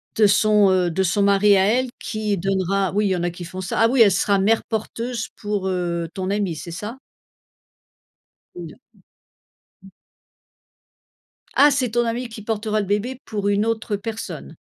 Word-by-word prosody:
De 215 - +4
son, 210 0 +4
heu, 180 -2 +2
de 190 +3 0
son 190 +3 +1
mari 200 +1 +4
à 190 0 +3
elle, 250 +4 +1
qui 215 -2 -2
donnera 195 +1 0
oui, 210 +1 +1
il - - 0
y 190 - +1
en 175 - -3
a 175 - +1
qui 175 0 -8
font 185 +2 -7
ça. 185 - -3
Ah 225 - +5
oui, 250 +1 +3
elle 210 -3 +7
sera 195 +1 +2
mère 220 +4 +2
porteuse 230 +1 -4
pour, 205 -2 -2
heu, 170 -2 -2
ton 185 -1 -4
amie, 200 -5 -1
c'est 170 +2 -8
ça? 210 +9 -7 1.6
Une, 170 -3 -8
heu, - - -17 1.1
mmh. - - -13
Mmh. - - -13 1.7
Ah! 290 +1 +6
C'est 255 -4 0
ton 240 +1 +1
amie 235 +2 -2
qui 225 -1 -9
portera 215 0 -2
le - - -4
bébé 210 +6 -2
pour 205 -2 -3
une 205 +1 +2
autre 220 -2 -1
personne? 220 +2 -7
205 Hz, 190 wpm, -22 LUFS, 190-225 Hz, 1.7 s, elle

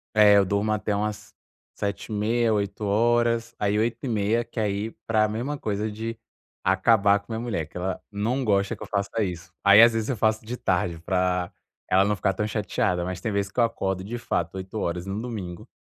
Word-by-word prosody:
É 105 -1 +7
eu 100 - +6
durmo 100 +3 0
até 105 0 -1
umas 105 +1 -3 0.4
7h30 110 +3 0
8h, 115 +3 +1
aí 105 +1 +1
8h30 115 -1 0
que 115 - -7
aí, 105 +1 -1 0.2
pra 110 -1 +3
mesma 120 +7 -3
coisa 105 -2 -2
de 115 +2 -5 0.4
acabar 100 +1 +4
com 100 +3 -15
minha 110 - -2
mulher, 110 -9 -2
que 80 - -11
ela 95 +1 -2
não 115 +6 -1
gosta 100 -3 +1
que - - -9
eu - - -8
faça 100 +2 -1
isso, 90 -4 -5
aí 100 +2 +8
às 115 0 +7
vezes 115 +2 -2
eu 125 - -1
faço 110 +1 +1
de 125 +2 -5
tarde 90 -5 0
pra 90 0 0 0.4
ela 95 +1 +5
não 105 +1 +1
ficar 95 0 0
tão 105 - -2
chateada 90 -4 -1
mas 90 0 -4
tem 110 - -2
vez 100 0 -1
que 110 - -5
eu - - +6
acordo 95 -5 -1
de 115 +5 -5
fato 85 -6 -2
8h 95 -2 -3
no 100 +2 -3
domingo, 105 -7 -6
105 Hz, 195 wpm, -25 LUFS, 95-115 Hz, 0.4 s, aí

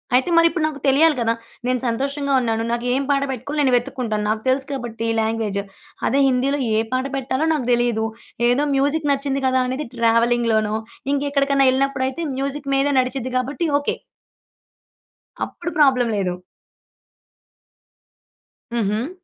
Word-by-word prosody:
అయితే 260 +6 +2
మరిప్పుడు 335 0 +3
నాకు 305 -2 -3
తెలియాలి 295 +3 +5
కదా! 230 -1 +2 0.3
నేను 250 0 +1
సంతోషంగా 275 +4 -1
ఉన్నాను. 225 -2 -1
నాకు 235 +1 -2
ఏం 270 +2 +1
పాట 275 0 +2
పెట్టుకోవాలి, 265 +4 -4
నేను 265 - +3
వెతుక్కుంటాను. 235 -3 -1
నాకు 215 0 0
తెలుసు 270 +1 +1
కాబట్టి 235 -4 -4
లాంగ్వేజు. 220 -3 -1 0.4
అదే 275 - +2
హిందిలో, 265 +3 +1 0.2
ఏ - - +3
పాట 255 +1 0
పెట్టాలో 270 +3 -1
నాకు 290 -6 -2
దెలీదు. 235 -2 +1 0.4
ఏదో 275 +4 +2
మ్యూజిక్ 290 +2 +1
నచ్చింది 275 0 -2
గదా! 260 0 +2
అనేది 260 +1 -3
ట్రావెలింగ్‌లోనో, 230 -2 +2 0.4
ఇంకక్కడికన్నా 280 -1 +2
ఎళ్ళినప్పుడయితే? 265 +2 -1 0.2
మ్యూజిక్ 275 +1 -3
మీద 275 +1 +2
నడిచిద్ది 255 0 -2
గాబట్టి 285 +7 -1
ఓకే. 285 - -2 1.5
అప్పుడు 345 - -6
ప్రాబ్లమ్ 255 -5 +4
లేదు. 185 -3 -1 2.4
హుహు. 225 - -1
260 Hz, 130 wpm, -21 LUFS, 235-280 Hz, 2.4 s, తెలియాలి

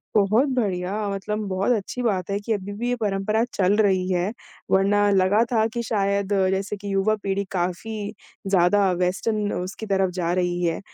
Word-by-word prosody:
बहुत 215 +7 +3
बढ़िया, 190 -5 -1 0.2
मतलब 200 +2 -3
बहुत 190 +4 0
अच्छी 220 +4 -4
बात 200 -6 -1
है 200 - 0
कि 220 +2 -2
अभी 205 -1 -4
भी 240 +4 -3
ये 245 - +1
परंपरा 210 0 0
चल 195 +1 +2
रही 190 -4 +2
है, 180 +3 0 0.4
वरना 205 +2 +3
लगा 195 +3 +4
था 220 -2 +3
कि 235 - -2
शायद 200 -2 0 0.2
जैसे 195 +2 -2
कि 200 0 -5
युवा 195 +3 +2
पीढ़ी 195 0 -1
काफ़ी 200 +4 -3 0.3
ज़्यादा 195 +1 +3
वेस्टन 205 +3 0
उसकी 185 +4 -5
तरफ़ 190 -2 +1
जा 175 -1 -1
रही 175 -1 0
है, 165 -1 0
200 Hz, 175 wpm, -24 LUFS, 185-210 Hz, 0.4 s, लगा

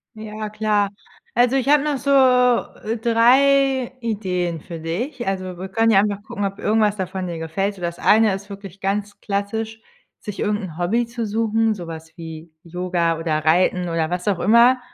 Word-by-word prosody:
Ja 215 0 -6
klar. 210 -1 0 0.4
Also, 245 +2 +3
ich 270 -1 0
habe 295 -1 +5
noch 295 -2 0
so, 280 +2 -1
äh, 250 -4 +3
3 260 +3 +3
Ideen 180 -8 -2
für 170 -1 -8
dich. 235 - -4
Also, 185 -2 -3
wir 190 +2 -6
können 225 +4 +2
ja 205 -3 +6
einfach 205 0 0
gucken, 215 -2 -4
ob 195 0 -4
irgendwas 215 -1 +2
davon 190 -1 -4
dir 170 -2 -5
gefällt. 180 +5 -2
So, 190 - -14
das 170 0 -3
eine 215 -2 +4
ist 195 +1 -9
wirklich 195 -1 -10
ganz 205 +1 -2
klassisch, 220 +2 -3 0.4
sich 210 -2 -8
irgend 210 +1 0
'n 165 -3 -10
Hobby 220 +7 0
zu 235 -1 -4
suchen, 225 +1 +1
so 180 -5 -8
was 160 0 -9
wie 160 -1 -9
Yoga 175 -1 -1
oder 155 -2 -1
Reiten 180 +2 +2
oder 165 -1 -1
was 180 +2 -3
auch 200 -3 +2
immer, 235 +6 +5
205 Hz, 185 wpm, -21 LUFS, 180-225 Hz, 0.4 s, ja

